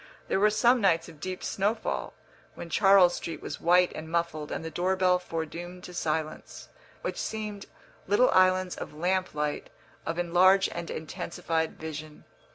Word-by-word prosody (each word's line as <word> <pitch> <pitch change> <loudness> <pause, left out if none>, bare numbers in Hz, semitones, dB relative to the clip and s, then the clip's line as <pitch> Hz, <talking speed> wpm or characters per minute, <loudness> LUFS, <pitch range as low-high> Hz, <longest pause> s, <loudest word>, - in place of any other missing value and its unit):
There - - +2
were 210 +2 +5
some 235 +3 +3
nights 165 -4 +2
of 160 -3 -14
deep 185 +3 -5
snowfall, 210 +3 -2 0.4
when 170 - -8
Charles 195 -2 +6
Street 165 - -5
was - - -7
white 180 +1 +4
and 160 +1 -7
muffled 170 -3 -2
and 160 - -4
the 160 - -5
door 185 +3 0
bell 185 -1 +3
foredoomed 175 +1 -6
to 180 - -9
silence, 155 -2 -4 0.3
which - - -3
seemed 210 -2 -5 0.4
little 205 +6 +4
islands 185 0 +3
of - - -8
lamp 185 +2 -1
light, 150 0 -2 0.3
of 165 - -3
enlarged 185 +3 +4
and 170 0 -5
intensified 160 +1 -3
vision. 155 -1 -7
175 Hz, 160 wpm, -28 LUFS, 160-190 Hz, 0.4 s, Charles